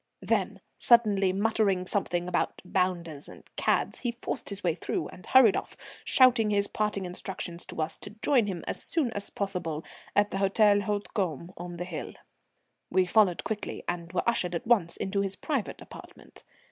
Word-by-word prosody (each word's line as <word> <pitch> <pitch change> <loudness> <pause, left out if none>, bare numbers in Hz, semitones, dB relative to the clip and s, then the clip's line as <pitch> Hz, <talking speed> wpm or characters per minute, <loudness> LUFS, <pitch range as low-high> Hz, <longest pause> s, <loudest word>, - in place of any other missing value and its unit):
Then, - - 0 0.2
suddenly 210 -5 +4
muttering 200 -2 +1
something 175 -3 -1
about 180 - -1
"bounders" 175 -5 -1
and - - -13
"cads," - - 0
he 240 - -1
forced 235 - -4
his 200 0 -4
way 170 -3 +2
through 165 - -3
and 180 - -13
hurried 255 -6 +7
off, - - -4 0.3
shouting 245 -4 +5
his 200 -1 +2
parting 210 -2 -2
instructions 180 -1 -5
to - - -8
us 155 - -4
to - - -8
join 250 -7 +4
him 180 -4 -4
as - - -3
soon 295 -8 0
as 205 -2 0
possible 175 -6 -3 0.3
at 205 0 +3
the - - -2
Hôtel 205 +1 +3
Hautecombe 190 - -2
on 175 0 -7
the 175 - -4
hill. 175 -3 -6 0.8
We 185 +1 +3
followed 180 -5 +3
quickly, 215 -2 -4
and 170 -1 -3
were 185 - -1
ushered 180 -7 +1
at 170 - -4
once 210 -8 +2
into 195 +1 -1
his 195 -1 0
private 275 -3 -3
apartment. - - -13
195 Hz, 170 wpm, -28 LUFS, 175-210 Hz, 0.8 s, hurried